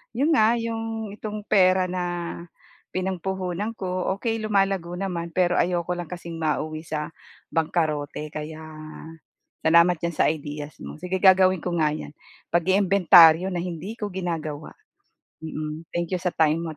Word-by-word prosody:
'yon 290 +6 +2
nga 230 -6 +4
'yong, 225 -2 -4
itong 210 0 -6
pera 185 -3 +3
na 180 -1 -2 0.9
pinangpuhunan 190 +2 -2
ko. 185 -1 -2
Okey, 225 +2 -2
lumalago 195 -4 0
naman 180 -3 -3
pero 180 -1 +2
ayoko 175 0 0
lang 175 -2 -3
kasing 170 -2 -7
mauwi 155 0 -2
sa 150 0 -3 0.4
bangkarote. 155 -2 -1
Kaya 155 +1 -6 1.0
salamat 170 +2 +5
diyan 170 -1 -3
sa - - +3
ideas 150 -1 -7
mo, - - -8
sige 180 +4 -3
gagawin 185 -1 +5
ko 175 +1 -3
nga 150 - +3
'yan 150 -1 -7 0.3
pag-iimbentaryo 180 -1 +5
na 175 - -2
hindi 180 +5 -5
ko 210 - -2
ginagawa. 165 -5 -4 0.7
Mm, 155 0 -5
thank 175 +1 -2
you 180 - -2
sa 180 - +1
time 160 0 +2
mo 165 - -4
180 Hz, 145 wpm, -24 LUFS, 160-190 Hz, 1.0 s, salamat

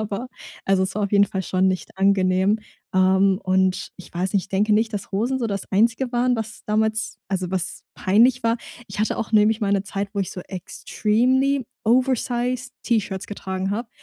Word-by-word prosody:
Aber 215 +4 -4 0.4
also, 190 -1 +3
es 190 - -4
war 210 - -1
auf 200 - -4
jeden 200 0 +6
Fall 190 -1 -3
schon 185 +1 +1
nicht 185 0 -4
angenehm. 195 +1 +3 0.3
Ähm, 190 +1 +4
und 190 +1 +1
ich 185 - -13
weiß 180 +2 -2
nicht, 195 - +2
ich - - -18
denke 210 +2 +1
nicht, 220 +1 +2
dass 205 -1 -5
Hosen 240 +7 0
so 235 - -1
das 200 -2 -3
Einzige 230 +5 +2
waren, 245 +1 +2
was 220 -1 -6
damals 215 0 0
also 185 -2 -1
was 185 -2 -3
peinlich 235 +6 +3
war. 230 +1 +2 0.3
Ich - - -8
hatte 215 - 0
auch 225 - -3
nämlich 215 +1 +4
mal 200 -1 +1
'ne 195 - +2
Zeit, 200 0 -3
wo - - -2
ich 190 - -2
so 180 - -6
extremely 250 +8 0 0.2
oversized 250 +1 +1
T-Shirts 210 -5 -1
getragen 190 -1 -4
habe. 230 +3 -3
205 Hz, 195 wpm, -23 LUFS, 190-230 Hz, 0.4 s, jeden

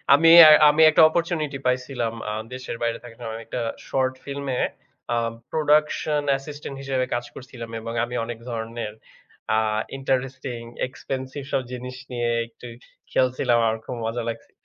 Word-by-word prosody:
আমি, 165 +2 +6
অ্যা 155 - +10 0.2
আমি 150 +2 +3
একটা 160 +1 +5
অপুরচুনিটি 160 -4 -1
পাইছিলাম 125 -2 -1 0.2
আ - - -2 0.2
দেশের 130 -2 -6
বাইরে 115 0 0
থাকা 115 -2 -11
সময়। 115 -2 -5
আমি 115 - -7
একটা 125 - -3 0.3
শর্ট 130 -1 +1
ফিল্ম 140 0 -5
এ, - - +1 0.5
আ - - +2 0.4
প্রোডাকশন 150 -1 +2
অ্যাসিস্ট্যান্ট 140 0 -4
হিসেবে 135 -2 -1
কাজ 120 - -3
করছিলাম 125 -3 -9
এবং 115 +1 -5
আমি 120 +1 -7
অনেক 120 -1 -6
ধরনের 115 -1 -4 0.6
আ - - +5 0.4
ইন্টারেস্টিং, 130 -2 -2 0.3
এক্সপেন্সিভ 130 +1 -6
সব - - +1
জিনিস 125 +1 -6 0.2
নিয়ে 120 -1 -1 0.2
একটু 120 +1 -13 0.4
খেলছিলাম, 125 -1 +2
আমার 110 0 +1
খুব 125 - -5
মজা 115 +1 -2
লাগছে। 115 - -7
130 Hz, 155 wpm, -24 LUFS, 120-140 Hz, 0.6 s, অ্যা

